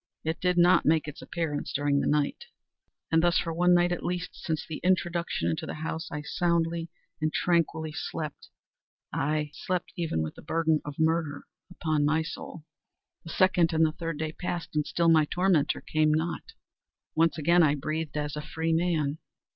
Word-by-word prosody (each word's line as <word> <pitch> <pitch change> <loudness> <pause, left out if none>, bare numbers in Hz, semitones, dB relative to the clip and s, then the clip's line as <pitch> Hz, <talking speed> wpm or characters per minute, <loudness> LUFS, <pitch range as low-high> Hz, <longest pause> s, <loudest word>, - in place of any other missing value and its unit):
It 160 +2 -2
did 180 -1 +1
not 175 0 +6
make 155 0 +2
its 150 - -8
appearance 160 -4 -3
during 145 0 +1
the - - 0
night; 150 -1 0 0.7
and 165 0 +4
thus 175 0 +3
for 165 - -1
one 180 +2 +4
night 175 0 +3
at 175 - -2
least, 175 0 -2
since 160 -2 -3
its 155 - -6
introduction 175 -1 +1
into 160 0 -2
the - - -4
house, 160 +1 -4
I 150 0 -4
soundly 170 0 0 0.3
and 155 0 +1
tranquilly 165 -2 +1
slept; 155 -1 -5 0.6
aye, 150 0 0
slept 180 -1 -3
even 165 - -1
with 80 - -4
the - - -13
burden 160 -1 +1
of 145 -1 -7
murder 160 -2 0 0.3
upon 155 -4 0
my 155 +2 +2
soul! 160 0 -8 0.6
The - - -8
second 175 -2 +3
and 160 0 +4
the 155 - +1
third 165 -1 -4
day 155 0 -2
passed, 175 -1 -5
and 150 -1 +1
still 170 -1 +1
my 160 -2 +6
tormentor 175 -2 +1
came 155 0 +2
not. 160 +3 -2 0.6
Once 165 +1 +2
again 170 +3 +4
I 150 -3 +4
breathed 155 +2 -3
as 150 0 -2
a 150 - -3
freeman. 160 -1 0
160 Hz, 180 wpm, -28 LUFS, 150-170 Hz, 0.7 s, not